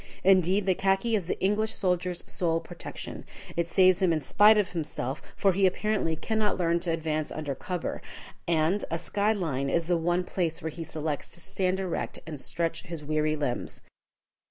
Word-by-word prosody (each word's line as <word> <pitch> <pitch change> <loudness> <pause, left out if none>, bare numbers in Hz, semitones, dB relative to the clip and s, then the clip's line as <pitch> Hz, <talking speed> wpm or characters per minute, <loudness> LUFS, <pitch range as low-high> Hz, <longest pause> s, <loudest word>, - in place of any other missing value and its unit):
Indeed, 190 +1 +4
the 190 - +4
khaki 195 +5 +1
is 190 -6 -1
the - - -2
English 210 +3 +1
soldier's 180 -2 0
sole 165 -2 0
protection. 170 +1 -7 0.3
It 170 0 -1
saves 185 +1 +5
him 185 -2 +4
in 160 - +2
spite 210 +8 +5
of 205 -1 +1
himself, 150 -5 -3
for 195 - +3
he 195 +1 +4
apparently 190 -3 0
cannot 215 +5 0
learn 170 -1 +2
to 175 0 -3
advance 155 -2 -1
under 150 -3 -3
cover, 175 +5 -4 0.5
and 170 +4 +2
a 165 - -1
sky 200 +5 0
line 145 -10 -1
is 165 +3 +1
the 175 +1 +2
one 175 +2 +1
place 170 -3 -2
where 160 - -4
he 165 +2 -6
selects 155 -2 -3
to - - -6
stand 185 +2 0
erect 185 -3 -3
and 150 -4 -6
stretch 165 +3 -1
his 165 -5 -7
weary 155 0 +1
limbs. 145 -5 -3
175 Hz, 180 wpm, -28 LUFS, 160-190 Hz, 0.5 s, saves